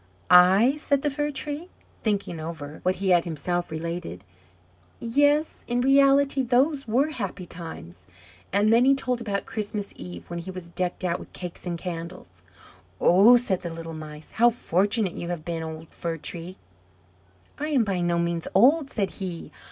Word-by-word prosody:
"I?" 190 Hz, +10 st, +7 dB
said 280 Hz, -2 st, 0 dB
the 295 Hz, -, +1 dB
Fir 295 Hz, +1 st, -1 dB
tree, 295 Hz, +4 st, -5 dB, 0.3 s
thinking 200 Hz, -6 st, -1 dB
over 155 Hz, -2 st, -7 dB
what 185 Hz, 0 st, +1 dB
he 195 Hz, 0 st, -2 dB
had 175 Hz, -2 st, +5 dB
himself 175 Hz, +2 st, -3 dB
related. 160 Hz, -, -5 dB, 0.8 s
"Yes, 290 Hz, +6 st, +1 dB
in 240 Hz, +1 st, 0 dB
reality 275 Hz, +1 st, +4 dB
those 265 Hz, +3 st, +1 dB
were 260 Hz, +7 st, +2 dB
happy 195 Hz, -8 st, -5 dB
times." 90 Hz, -, -10 dB, 0.4 s
And 205 Hz, +3 st, +3 dB
then 235 Hz, +2 st, +5 dB
he 275 Hz, +1 st, +5 dB
told 250 Hz, -2 st, -2 dB
about 200 Hz, -3 st, -2 dB
Christmas 210 Hz, -2 st, -4 dB
Eve, 90 Hz, -2 st, -9 dB
when 170 Hz, -, -5 dB
he 170 Hz, -, -7 dB
was 185 Hz, -2 st, -8 dB
decked 180 Hz, +1 st, -3 dB
out 175 Hz, -1 st, 0 dB
with -, -, -12 dB
cakes 180 Hz, 0 st, -8 dB
and 170 Hz, -1 st, -2 dB
candles. 165 Hz, -, -7 dB, 0.6 s
"Oh," 205 Hz, +8 st, +7 dB
said 200 Hz, -7 st, -1 dB
the 170 Hz, -, -4 dB
little 165 Hz, 0 st, -7 dB
Mice, 155 Hz, -1 st, -9 dB
"how 240 Hz, +2 st, +5 dB
fortunate 205 Hz, -2 st, 0 dB
you 170 Hz, -, -6 dB
have 170 Hz, -3 st, -4 dB
been, 165 Hz, -1 st, -3 dB
old 160 Hz, 0 st, -7 dB
Fir 165 Hz, -2 st, -4 dB
tree!" 170 Hz, +3 st, -6 dB, 1.0 s
"I 300 Hz, -, -2 dB
am 275 Hz, -6 st, +3 dB
by 195 Hz, -4 st, -1 dB
no 175 Hz, 0 st, +1 dB
means 170 Hz, -1 st, -1 dB
old," 275 Hz, +8 st, +5 dB
said 200 Hz, -6 st, -2 dB
he. 180 Hz, -4 st, -6 dB
185 Hz, 170 wpm, -25 LUFS, 170-245 Hz, 1.0 s, I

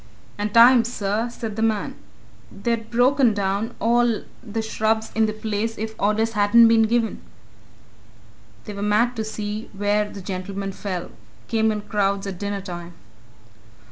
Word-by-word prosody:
"And 205 Hz, 0 st, -3 dB
time, 235 Hz, +2 st, +7 dB
sir," 225 Hz, 0 st, -2 dB
said 225 Hz, -3 st, -6 dB
the -, -, -1 dB
man. 220 Hz, -2 st, 0 dB, 0.6 s
"They'd 225 Hz, +3 st, -2 dB
ha' -, -, -22 dB
broken 245 Hz, -1 st, +3 dB
down 200 Hz, +3 st, -1 dB
all 235 Hz, 0 st, +2 dB, 0.2 s
the 225 Hz, -2 st, -4 dB
shrubs 220 Hz, 0 st, 0 dB
in 220 Hz, 0 st, +2 dB
the -, -, -1 dB
place 215 Hz, +1 st, -3 dB
if 220 Hz, +1 st, -4 dB
orders 215 Hz, +2 st, +1 dB
hadn't 220 Hz, +2 st, +6 dB
been 225 Hz, -1 st, +4 dB
given! 230 Hz, -1 st, 0 dB, 1.4 s
They 210 Hz, -, -6 dB
were 200 Hz, -, -6 dB
mad 215 Hz, +4 st, +2 dB
to 220 Hz, -, -1 dB
see 215 Hz, 0 st, -5 dB
where 205 Hz, +1 st, +1 dB
the 200 Hz, -, -9 dB
gentleman 195 Hz, +1 st, -4 dB
fell 185 Hz, -2 st, -5 dB, 0.4 s
came 220 Hz, -1 st, +2 dB
in 210 Hz, -1 st, -3 dB
crowds 200 Hz, -2 st, -1 dB
at 190 Hz, -3 st, -6 dB
dinnertime." 190 Hz, -4 st, -5 dB
215 Hz, 150 wpm, -23 LUFS, 205-225 Hz, 1.4 s, time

